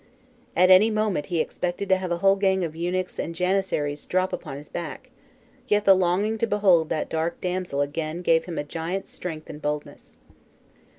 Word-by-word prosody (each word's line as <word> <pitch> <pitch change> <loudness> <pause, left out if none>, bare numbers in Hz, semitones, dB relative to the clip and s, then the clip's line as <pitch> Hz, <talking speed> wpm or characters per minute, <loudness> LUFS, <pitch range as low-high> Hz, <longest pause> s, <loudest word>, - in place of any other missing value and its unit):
At 185 +2 +5
any 195 +4 +7
moment 215 -7 0
he 175 -3 -1
expected 180 +4 -2
to 190 - +6
have 185 -1 -4
a 175 - +1
whole 195 +2 +4
gang 190 -1 +1
of 160 -1 -6
eunuchs 180 +2 -2
and 165 - -3
janissaries 180 -5 -1
drop 185 +1 0
upon 145 -5 -5
his 145 +1 -10
back, 175 +9 -7 0.6
yet 210 -2 +2
the 195 - +8
longing 190 +4 +1
to 230 - +1
behold 190 -7 +3
that 155 - -1
dark 160 +1 -2
damsel 180 -5 -2
again 155 +4 -3
gave 165 -1 +3
him 170 -2 -6
a - - -1
giant's 165 +5 -4
strength 160 -3 -6
and 150 - -9
boldness. 150 0 -5
180 Hz, 185 wpm, -25 LUFS, 160-190 Hz, 0.6 s, the